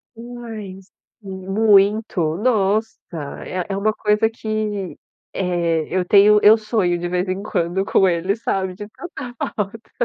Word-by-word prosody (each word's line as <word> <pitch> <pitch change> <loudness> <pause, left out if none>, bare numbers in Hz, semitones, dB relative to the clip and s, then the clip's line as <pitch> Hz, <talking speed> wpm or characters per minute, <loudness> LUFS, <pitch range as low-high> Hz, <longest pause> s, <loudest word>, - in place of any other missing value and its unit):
Demais. 225 -5 -9 0.3
M 190 -2 -8
muito, 200 -5 +3
nossa! 215 -1 +2 0.6
É 180 -1 -3
é 195 - -2
uma 215 +2 +1
coisa 210 +1 +1
que, 215 -4 -4 0.4
eh, 170 -3 0
eu 185 0 0
tenho 205 +2 +6
eu 220 +2 +7
sonho 210 -5 0
de 175 0 -3
vez 180 +1 -1
em 185 +2 -3
quando 175 -1 -1
com 190 -1 +3
eles, 185 +5 -1
sabe, 190 -1 -1
de 205 +2 -8
tanta 260 -3 -8 0.2
falta. 215 +2 -5
200 Hz, 145 wpm, -20 LUFS, 185-215 Hz, 0.6 s, eu